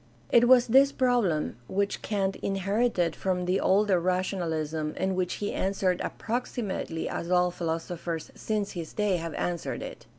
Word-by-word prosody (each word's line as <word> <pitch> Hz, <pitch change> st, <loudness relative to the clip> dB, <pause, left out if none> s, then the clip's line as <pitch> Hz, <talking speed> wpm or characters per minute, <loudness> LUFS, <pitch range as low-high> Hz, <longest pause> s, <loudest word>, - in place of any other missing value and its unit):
It 240 Hz, 0 st, +6 dB
was 250 Hz, -1 st, +7 dB
this 270 Hz, +4 st, +5 dB
problem 235 Hz, -, +1 dB
which 200 Hz, +1 st, -1 dB
Kant 195 Hz, -2 st, -1 dB
inherited 195 Hz, -2 st, 0 dB
from 180 Hz, -1 st, -1 dB
the 185 Hz, +2 st, +1 dB
older 195 Hz, -1 st, +3 dB
rationalism, 165 Hz, -4 st, -1 dB
and 190 Hz, 0 st, 0 dB
which 180 Hz, -1 st, -1 dB
he 205 Hz, -, -3 dB
answered 190 Hz, -2 st, 0 dB
approximately 225 Hz, -8 st, -3 dB
as 170 Hz, -, -4 dB
all 180 Hz, 0 st, +3 dB
philosophers 165 Hz, -1 st, -4 dB
since 210 Hz, -2 st, -2 dB
his 170 Hz, -3 st, -6 dB
day 210 Hz, -4 st, +1 dB
have 165 Hz, -1 st, -5 dB
answered 175 Hz, -1 st, -3 dB
it. -, -, -9 dB
185 Hz, 145 wpm, -28 LUFS, 170-210 Hz, -, was